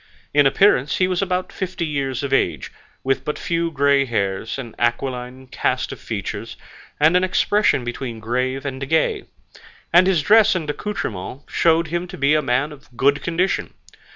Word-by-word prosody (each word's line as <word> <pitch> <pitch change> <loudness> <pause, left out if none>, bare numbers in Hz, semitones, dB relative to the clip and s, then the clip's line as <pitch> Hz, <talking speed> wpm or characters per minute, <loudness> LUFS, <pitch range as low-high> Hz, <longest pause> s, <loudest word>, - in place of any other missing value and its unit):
In 145 -1 +5
appearance 140 -3 +3
he 185 - +2
was 185 0 -1
about 185 -1 -2
fifty 185 -3 -3
years 140 -3 -2
of 140 -1 -2
age, 80 - 0 0.3
with 135 0 0
but 150 - -3
few 170 -1 -1
grey 140 -2 +2
hairs, 100 -2 -2
an 120 -4 -7
aquiline 125 +2 -2
cast 130 - -1
of - - -8
features, - - -5 0.4
and 155 +4 +4
an 180 - +4
expression 205 -4 +2
between 120 -1 -5
grave 130 +4 -2
and 135 -1 -4
gay; 390 - +1 0.7
and 180 +2 +6
his 175 -6 +2
dress 220 +3 +5
and 165 -4 -3
accoutrements 140 - -5
showed 165 0 +3
him 175 +2 -2
to 185 - -9
be 140 +2 +3
a 155 - +3
man 135 +3 0
of 145 -2 -14
good 140 +4 +3
condition. 175 +3 -1
145 Hz, 170 wpm, -21 LUFS, 130-175 Hz, 0.7 s, and